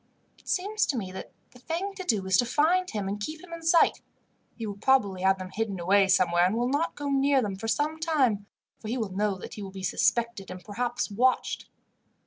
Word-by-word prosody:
"It - - -26
seems 415 +3 0
to 270 - -1
me 190 -5 -4
that 190 - -8 0.2
the 250 - -17
thing 345 +9 -3
to 380 -1 -7
do 215 - 0
is 190 0 +2
to 245 - +3
find 345 +8 +2
him, 205 -3 -3
and 200 +1 -3
keep 310 +9 -5
him 350 -2 -11
in 335 - -7
sight. 330 +1 +4 0.5
He 230 - -5
will 200 -1 -6
probably 200 -7 +2
have 190 0 +3
them 185 0 -7
hidden 210 -3 -2
away 195 +3 +4
somewhere, 175 -2 +3
and 195 - -1
will 240 +1 +1
not 290 +5 0
go 290 -1 -4
near 275 0 +3
them 205 -6 -2
for 195 +4 -6
some 300 +7 0
time, 260 -11 +1 0.3
for 215 - -9
he 240 +4 -2
will 220 -5 -3
know 205 -1 0
that - - -9
he 210 - -7
will 195 - -6
be 190 0 -9
suspected, 235 +1 0
and 180 0 -8
perhaps 240 +2 -2
watched." 250 +5 +1
230 Hz, 230 wpm, -27 LUFS, 195-290 Hz, 0.5 s, sight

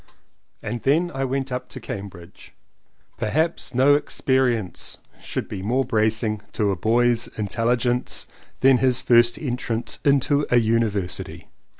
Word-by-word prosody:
And 115 +2 -4
then 165 +6 +2
I 135 0 -1
went 135 0 -2
up 125 0 -4
to - - -8
Cambridge. 95 -2 -9 0.6
Per 110 - -1
haps 160 -1 -1
no 135 +3 +5
experience 130 -7 0 0.2
should - - -4
be 95 - -6
more 125 +7 0
bracing 110 -2 0
to 105 -3 +1
a - - -1
boy's 115 +4 +2
intelligence 120 +4 0 0.4
than 130 -1 +5
his 130 -1 +2
first 120 -1 +4
entrance 120 -4 -3
into 140 +1 +2
a 125 - +4
University. 110 -5 -1
120 Hz, 130 wpm, -23 LUFS, 110-130 Hz, 0.6 s, no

